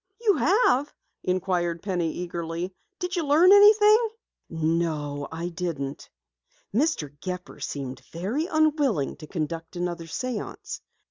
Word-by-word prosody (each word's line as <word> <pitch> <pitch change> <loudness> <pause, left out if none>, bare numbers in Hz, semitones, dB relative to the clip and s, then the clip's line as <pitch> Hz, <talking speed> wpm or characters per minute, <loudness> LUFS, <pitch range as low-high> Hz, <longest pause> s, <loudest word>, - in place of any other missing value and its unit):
"You 445 -3 +4
have?" 290 - +3 0.3
inquired 180 -2 -1
Penny 175 -5 0
eagerly. 170 +1 -4 0.2
"Did 360 0 -3
you 345 - 0
learn 310 +6 +6
anything?" 425 +2 +7 0.4
"No, 155 -3 -1
I 165 +2 -3
didn't. 160 -6 -4 0.6
Mr. 220 - 0
Gepper 180 +1 -6
seemed 135 -2 -5
very 215 - -2
unwilling 295 - +2
to 155 - -10
conduct 165 +1 -4
another 175 -1 -3
séance. 240 +6 -5
180 Hz, 115 wpm, -26 LUFS, -, 0.6 s, anything